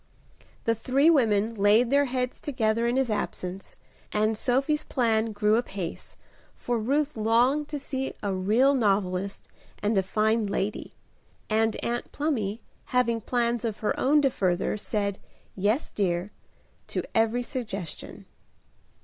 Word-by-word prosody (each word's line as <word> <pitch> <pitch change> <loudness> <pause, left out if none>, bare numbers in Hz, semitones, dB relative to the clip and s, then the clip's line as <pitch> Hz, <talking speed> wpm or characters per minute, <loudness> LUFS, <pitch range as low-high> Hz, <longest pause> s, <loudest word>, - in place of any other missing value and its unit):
The 230 - +2
three 265 +8 +3
women 225 -6 +2
laid 215 +4 +4
their 285 0 +4
heads 250 -1 -3
together 230 -4 0
in 240 - +1
his 265 -4 +1
absence, 190 -2 -4 0.4
and 215 +1 +1
Sophie's 275 +7 +1
plan 225 -3 +1
grew 210 +1 +2
apace, 195 -7 -5 0.4
for 240 -1 -2
Ruth 285 +6 0
longed 240 +7 +2
to 295 - -4
see 270 -1 -4
a 200 -2 0
real 215 +9 +3
novelist 195 -5 0 0.3
and 210 +2 0
a 195 - +4
fine 215 +3 +1
lady, 200 +1 -3 0.6
and 220 0 +2
Aunt 240 +1 -2
Plumy, 235 -8 -2 0.2
having 235 -3 +1
plans 235 0 0
of 220 -3 -3
her 215 - +1
own 290 +2 +4
to 270 - +3
further, 185 -4 0
said 205 -1 -2 0.4
"Yes, 210 - 0
dear," 180 -1 -1 0.6
to - - -2
every 225 +2 +2
suggestion. 210 - -6
225 Hz, 135 wpm, -27 LUFS, 205-255 Hz, 0.6 s, laid